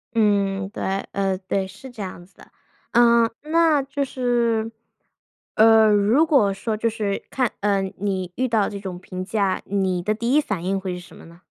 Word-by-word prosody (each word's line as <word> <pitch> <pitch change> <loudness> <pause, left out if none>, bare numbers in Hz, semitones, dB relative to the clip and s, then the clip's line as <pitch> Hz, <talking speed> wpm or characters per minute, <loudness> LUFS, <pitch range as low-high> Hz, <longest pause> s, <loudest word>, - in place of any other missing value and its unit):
嗯， 200 -3 +1
对， 220 - -7 0.3
呃 195 -1 -1
对， 190 0 -2
是 210 +7 -12
这 225 -4 -8
样 185 -2 -7
子 195 - -30
的。 - - -18 0.4
呃， 235 -1 +5
那 315 -1 +3
就 280 +1 -2
是， 235 -4 0 0.8
呃， 220 0 +6
如 215 +10 +3
果 250 -11 +3
说 215 +3 -3
就 230 +1 0
是 210 -3 -3
看 255 -4 0
呃， 200 -1 +1 0.2
你 190 -3 -2
遇 260 0 -1
到 220 -4 +2
这 200 - -6
种 190 -3 -6
评 185 0 -7
价， 200 -1 -1
你 190 -3 -1
的 210 +4 0
第 235 +3 -1
一 300 - +6
反 195 - -4
应 195 +1 -1
会 190 -1 -4
是 180 - -7
什 175 - -15
么 - - -13
呢？ 170 +2 -17
205 Hz, 205 characters per minute, -22 LUFS, 195-235 Hz, 0.8 s, 呃